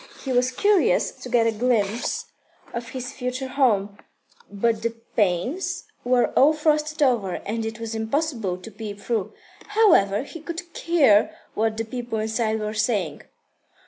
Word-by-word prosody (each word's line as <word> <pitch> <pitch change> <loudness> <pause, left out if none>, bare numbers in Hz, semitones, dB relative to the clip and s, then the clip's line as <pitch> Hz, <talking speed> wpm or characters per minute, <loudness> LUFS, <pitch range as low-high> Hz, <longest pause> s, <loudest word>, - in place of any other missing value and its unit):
He 270 - -3
was 250 0 +3
curious 415 - +3
to 250 - -10
get 235 -2 +3
a 230 - +3
glimpse 225 -1 0 0.5
of 235 0 -5
his 255 +2 -6
future 255 +1 -4
home, 210 -7 +1 0.5
but 220 +2 0
the 230 0 -2 0.2
panes 210 - 0 0.2
were 245 0 +3
all 295 +3 +6
frosted 305 0 +1
over, 225 -9 +2
and 225 +2 -2
it 225 0 -6
was 230 0 -4
impossible 225 - -1
to 185 +5 -11
peep 210 -1 -7
through. 220 -2 -2 0.3
However, 325 - +4
he 330 +4 -9
could 340 +2 -5
hear 275 -12 +4 0.2
what 220 0 0
the 225 - -2
people 240 0 -4
inside 220 0 0
were 215 0 -3
saying. 215 -1 0
235 Hz, 150 wpm, -24 LUFS, 215-270 Hz, 0.5 s, all